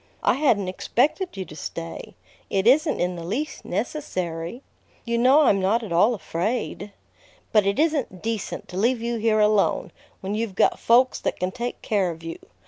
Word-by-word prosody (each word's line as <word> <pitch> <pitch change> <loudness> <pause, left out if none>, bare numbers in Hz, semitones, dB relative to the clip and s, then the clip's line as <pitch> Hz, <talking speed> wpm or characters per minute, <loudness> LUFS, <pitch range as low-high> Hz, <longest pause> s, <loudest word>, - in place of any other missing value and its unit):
"I - - +4
hadn't 240 -9 +2
expected 270 - 0
you 190 - -3
to 155 - -12
stay. 85 - -7 0.3
It 195 0 0
isn't 300 +6 +4
in 180 0 0
the 170 - -6
least 265 - -3
necessary. 185 - -4 0.4
You 235 0 0
know 260 +5 +6
I'm 205 -9 +4
not 210 +5 +1
at 210 - -7
all 210 +8 +4
afraid." 200 +4 -3 0.6
"But 210 -3 +4
it 200 - +1
isn't 290 - 0
decent 225 -3 -3
to 180 - -7
leave 230 +3 +1
you 235 0 -1
here 220 -1 +2
alone, 210 -1 +2 0.3
when 195 +1 -3
you've 215 -2 -2
got - - +3
folks 250 +2 +4
that - - -3
can 185 0 -1
take 240 +3 -5
care 200 -4 +1
of 165 -1 -8
you. 165 0 -6
215 Hz, 180 wpm, -24 LUFS, 185-245 Hz, 0.6 s, know